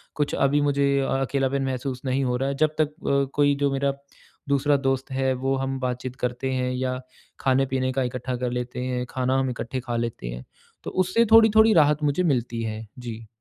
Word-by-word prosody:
कुछ 145 Hz, -1 st, -1 dB
अभी 145 Hz, +1 st, +2 dB
मुझे 140 Hz, -1 st, +2 dB
अ 135 Hz, -, -1 dB
अकेलापन 135 Hz, 0 st, 0 dB
महसूस 130 Hz, -1 st, -3 dB
नहीं 130 Hz, +1 st, 0 dB
हो 125 Hz, -1 st, 0 dB
रहा 135 Hz, +1 st, -1 dB
है 140 Hz, -, -2 dB
जब 155 Hz, 0 st, +1 dB
तक 150 Hz, -, +3 dB
अ, 140 Hz, -3 st, 0 dB
कोई 145 Hz, -1 st, +3 dB
जो 140 Hz, 0 st, 0 dB
मेरा 140 Hz, 0 st, 0 dB, 0.6 s
दूसरा 140 Hz, +1 st, +3 dB
दोस्त 135 Hz, 0 st, -1 dB
है 130 Hz, 0 st, +1 dB
वो 135 Hz, 0 st, +2 dB
हम 135 Hz, 0 st, -2 dB
बातचीत 125 Hz, 0 st, -3 dB
करते 125 Hz, +2 st, -2 dB
हैं 125 Hz, 0 st, -1 dB
या 130 Hz, 0 st, -2 dB, 0.4 s
खाने-पीने 130 Hz, -1 st, +1 dB
का 135 Hz, -, 0 dB
इकट्ठा 125 Hz, 0 st, -3 dB
कर 125 Hz, 0 st, -2 dB
लेते 125 Hz, 0 st, -4 dB
हैं, 125 Hz, -1 st, -2 dB
खाना 130 Hz, +1 st, 0 dB
हम 130 Hz, -1 st, 0 dB
इकट्ठे 120 Hz, +1 st, -4 dB
खा 120 Hz, -1 st, -4 dB
लेते 115 Hz, -, -3 dB
हैं। -, -, -7 dB, 0.4 s
तो -, -, -5 dB
उससे 185 Hz, +5 st, +2 dB
थोड़ी-थोड़ी 220 Hz, -1 st, +7 dB
राहत 150 Hz, -1 st, +4 dB
मुझे 150 Hz, +5 st, +1 dB
मिलती 120 Hz, -6 st, 0 dB
है। 110 Hz, 0 st, -4 dB
जी। 115 Hz, -2 st, -7 dB
135 Hz, 200 wpm, -24 LUFS, 125-140 Hz, 0.6 s, थोड़ी-थोड़ी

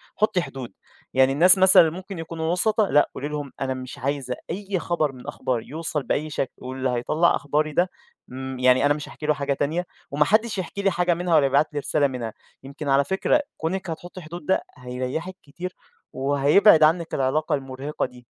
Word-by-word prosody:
حُطّي 200 Hz, -3 st, +2 dB
حدود، 130 Hz, -, -7 dB, 0.4 s
يعني 130 Hz, 0 st, +4 dB
الناس 180 Hz, +6 st, +6 dB
مثلًا 190 Hz, 0 st, +8 dB
اللي 160 Hz, -, -4 dB
ممكن 190 Hz, -2 st, -8 dB
يكونوا 165 Hz, 0 st, -3 dB
وُسَطا، 210 Hz, +3 st, +2 dB
لأ 145 Hz, -, +4 dB
قولي 145 Hz, -, -4 dB
لهم 145 Hz, -2 st, -5 dB
أنا 130 Hz, -1 st, 0 dB
مش 130 Hz, 0 st, -8 dB
عايزة 135 Hz, -1 st, -2 dB
أي 195 Hz, +1 st, -3 dB
خبر 160 Hz, -4 st, 0 dB
من 125 Hz, -2 st, -13 dB
أخباري 120 Hz, -3 st, -3 dB
يوصل 155 Hz, -1 st, -3 dB
بأي 150 Hz, +5 st, -1 dB
شكل، 135 Hz, -3 st, -2 dB
واللي 130 Hz, +1 st, -3 dB
هيطَلّع 150 Hz, +8 st, +2 dB
أخباري 150 Hz, +2 st, -1 dB
ده، 180 Hz, +4 st, +2 dB, 0.4 s
امم، 130 Hz, 0 st, -6 dB
يعني 130 Hz, +2 st, +4 dB
أنا 145 Hz, -, +4 dB
مش 150 Hz, 0 st, -7 dB
هاحكي 150 Hz, -, -8 dB
له 150 Hz, -, +3 dB
حاجة 140 Hz, 0 st, -1 dB
تانية، 160 Hz, +6 st, -1 dB, 0.3 s
وما 150 Hz, +1 st, +3 dB
حدش 215 Hz, +2 st, +2 dB
يحكي 190 Hz, +2 st, -4 dB
لي 195 Hz, -, +2 dB
حاجة 175 Hz, 0 st, +2 dB
منها، 175 Hz, -1 st, 0 dB
ولا 145 Hz, -3 st, +5 dB
يبعت 140 Hz, +3 st, +2 dB
لي 145 Hz, -, -1 dB
رسالة 145 Hz, 0 st, +1 dB
منها، 120 Hz, -4 st, -5 dB, 0.3 s
يمكن 140 Hz, +2 st, -6 dB
على 135 Hz, +1 st, +4 dB
فكرة 190 Hz, -, +1 dB, 0.2 s
كونِك 185 Hz, +3 st, -3 dB
هتحُطّي 175 Hz, +3 st, -7 dB
حدود 165 Hz, 0 st, -9 dB
ده 190 Hz, -, +2 dB, 0.2 s
هيرَيحك 130 Hz, +8 st, -4 dB
كتير، 175 Hz, +6 st, -7 dB, 0.4 s
وهيبعد 145 Hz, +6 st, +5 dB
عنِّك 165 Hz, +2 st, +2 dB
العلاقة 145 Hz, +4 st, +1 dB
المرهقِة 135 Hz, +2 st, -4 dB
دي. 125 Hz, -1 st, -13 dB
150 Hz, 195 wpm, -24 LUFS, 135-175 Hz, 0.4 s, مثلًا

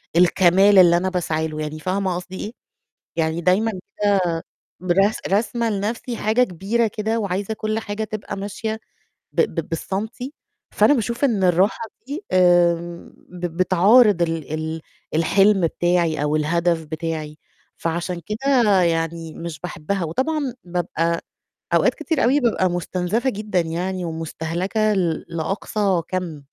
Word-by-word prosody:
الكمال 185 Hz, +3 st, +5 dB
اللي 175 Hz, -2 st, +7 dB
أنا 185 Hz, +2 st, 0 dB
باسعي 160 Hz, -3 st, -1 dB
له، 155 Hz, 0 st, -6 dB
يعني 155 Hz, +1 st, -5 dB
فاهمة 185 Hz, +1 st, -1 dB
قصدي 185 Hz, +1 st, -7 dB
إيه؟ 215 Hz, -, -6 dB, 0.7 s
يعني 160 Hz, +1 st, 0 dB
دايمًا 200 Hz, +6 st, +2 dB, 0.4 s
كده 175 Hz, -4 st, +1 dB, 0.4 s
برس 195 Hz, +4 st, +2 dB
راسمة 225 Hz, +3 st, 0 dB
لنَفْسي 220 Hz, +4 st, -3 dB
حاجة 220 Hz, +4 st, +2 dB
كبيرة 210 Hz, +5 st, 0 dB
كده، 220 Hz, +2 st, -2 dB
وعايزة 200 Hz, +1 st, -2 dB
كل 215 Hz, +1 st, -2 dB
حاجة 220 Hz, 0 st, -4 dB
تبقى 215 Hz, -1 st, -5 dB
ماشية 220 Hz, +2 st, -4 dB, 0.5 s
ب -, -, +1 dB
ب 165 Hz, -, -1 dB
بالسنتي، 220 Hz, -, -4 dB, 0.4 s
فأنا 215 Hz, +8 st, +5 dB
باشوف 235 Hz, +2 st, -1 dB
إن 210 Hz, -8 st, +2 dB
الراحة 185 Hz, +6 st, +3 dB, 0.3 s
دي، 310 Hz, +9 st, -5 dB
آمم، 175 Hz, -1 st, +2 dB
ب 180 Hz, 0 st, -4 dB
بتعارض 190 Hz, +2 st, +5 dB
ال 165 Hz, -2 st, -2 dB
ال 160 Hz, +1 st, -3 dB, 0.3 s
الحلم 195 Hz, +5 st, +4 dB
بتاعي 170 Hz, -3 st, +1 dB
أو 150 Hz, +1 st, +1 dB
الهدف 165 Hz, +1 st, +1 dB
بتاعي، 155 Hz, -1 st, -5 dB, 0.4 s
فعشان 170 Hz, +1 st, -3 dB
كده 220 Hz, -4 st, +3 dB
يعني 165 Hz, -1 st, -1 dB
مش 170 Hz, -2 st, -7 dB
باحبها، 180 Hz, +2 st, -3 dB
وطبعًا 265 Hz, -, -1 dB
بابقى 170 Hz, -1 st, -1 dB, 0.5 s
أوقات -, -, +4 dB
كتير 320 Hz, -8 st, -1 dB
أوي 275 Hz, +4 st, +4 dB
بابقى 220 Hz, -6 st, +2 dB
مستنزَفة 180 Hz, +8 st, -1 dB
جدًا 205 Hz, -4 st, -1 dB
يعني 175 Hz, +3 st, -3 dB
ومستهلكة 170 Hz, +6 st, -1 dB
ل 170 Hz, -4 st, 0 dB
لأقصى 190 Hz, +2 st, -1 dB
كَم. 175 Hz, -6 st, -4 dB
185 Hz, 135 wpm, -22 LUFS, 170-215 Hz, 0.7 s, اللي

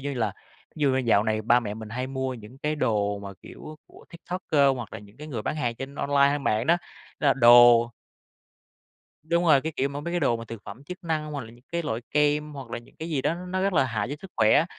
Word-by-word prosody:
như 140 Hz, 0 st, -4 dB
là 120 Hz, -3 st, -1 dB, 0.4 s
thí -, -, -9 dB
dụ 140 Hz, -, +4 dB
như 130 Hz, -, +1 dB
dạo 115 Hz, -5 st, +3 dB
này 110 Hz, 0 st, -1 dB
ba 120 Hz, +3 st, +4 dB
mẹ 105 Hz, -2 st, -5 dB
mình 110 Hz, -1 st, -8 dB
hay 125 Hz, +4 st, -3 dB
mua 130 Hz, -1 st, -3 dB
những 115 Hz, +2 st, -12 dB
cái 150 Hz, +2 st, -1 dB
đồ 105 Hz, -7 st, 0 dB
mà, 100 Hz, 0 st, -8 dB
kiểu, 155 Hz, 0 st, -11 dB
của -, -, -17 dB
TikToker 160 Hz, -6 st, +1 dB
hoặc 120 Hz, -4 st, -7 dB
là -, -, -6 dB
những 100 Hz, +2 st, -16 dB
cái 150 Hz, -, -9 dB
người 120 Hz, -8 st, -5 dB
bán 155 Hz, -, -2 dB
hàng 120 Hz, -6 st, -1 dB
trên 135 Hz, +3 st, -8 dB
online 140 Hz, 0 st, +3 dB
hay 145 Hz, -, 0 dB
mạng 115 Hz, -4 st, 0 dB
đó. 170 Hz, -, +5 dB, 0.4 s
Đó -, -, +1 dB
là -, -, +4 dB
đồ 120 Hz, -1 st, +7 dB, 1.3 s
Đúng 170 Hz, +2 st, +1 dB
rồi, 150 Hz, -5 st, +5 dB
cái 160 Hz, +2 st, -4 dB
kiểu 135 Hz, -, +1 dB
mà, 140 Hz, +1 st, -5 dB
mấy 170 Hz, +3 st, -5 dB
cái 175 Hz, -, 0 dB
đồ 120 Hz, -6 st, +2 dB
mà 115 Hz, -, -8 dB
thực 115 Hz, -2 st, -9 dB
phẩm 115 Hz, +8 st, -10 dB
chức 180 Hz, +4 st, -9 dB
năng 155 Hz, -2 st, -2 dB
hoặc 145 Hz, -, -3 dB
là 110 Hz, -, -12 dB
những 120 Hz, +2 st, -19 dB
cái 170 Hz, 0 st, -1 dB
loại 115 Hz, -7 st, -3 dB
kem, 150 Hz, +1 st, +1 dB
hoặc 135 Hz, -5 st, -9 dB
là 120 Hz, -, -3 dB
những 120 Hz, -, -18 dB
cái 160 Hz, -, -6 dB
gì 145 Hz, -5 st, -1 dB
đó 160 Hz, -, +1 dB
nó 180 Hz, +2 st, -4 dB
rất 195 Hz, 0 st, +1 dB
là 140 Hz, -6 st, +3 dB
hại 115 Hz, -4 st, -2 dB
cho 140 Hz, -, -3 dB
sức 195 Hz, -, -11 dB
khỏe, 110 Hz, +7 st, +5 dB
135 Hz, 270 wpm, -26 LUFS, 115-150 Hz, 1.3 s, đồ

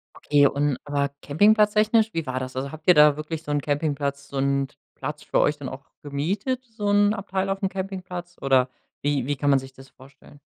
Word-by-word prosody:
Okay, 145 Hz, -1 st, +3 dB
und 140 Hz, -1 st, 0 dB
aber 140 Hz, -1 st, 0 dB
Campingplatz 210 Hz, +7 st, +4 dB
technisch, 220 Hz, +1 st, +3 dB
wie 165 Hz, -2 st, -2 dB
war 130 Hz, -1 st, -2 dB
das? 130 Hz, 0 st, -6 dB
Also, 135 Hz, +1 st, -3 dB
habt 155 Hz, +2 st, -11 dB
ihr 180 Hz, -, +9 dB
da 150 Hz, -1 st, +6 dB
wirklich 155 Hz, +1 st, -5 dB
so 150 Hz, -, -5 dB
'n 145 Hz, 0 st, +1 dB
Campingplatz, 145 Hz, -1 st, -2 dB
so 140 Hz, -, -6 dB
'n 140 Hz, 0 st, +1 dB, 0.3 s
Platz 150 Hz, +2 st, -6 dB
für -, -, 0 dB
euch 150 Hz, -, +2 dB
dann 140 Hz, -3 st, -6 dB
auch 135 Hz, +2 st, -10 dB, 0.2 s
gemietet, 195 Hz, -, -2 dB
so 220 Hz, -3 st, -4 dB
'n 205 Hz, 0 st, +4 dB
Abteil 195 Hz, -1 st, -2 dB
aufm 195 Hz, 0 st, 0 dB
Campingplatz? 185 Hz, -2 st, -6 dB
Oder 130 Hz, -2 st, +3 dB, 0.3 s
wie 145 Hz, -3 st, 0 dB
wie 145 Hz, +2 st, -1 dB
kann 145 Hz, +1 st, 0 dB
man 140 Hz, -, +5 dB
sich 135 Hz, 0 st, -11 dB
das 135 Hz, 0 st, -15 dB
vorstellen? 135 Hz, +2 st, -18 dB
145 Hz, 210 wpm, -24 LUFS, 140-190 Hz, 0.3 s, ihr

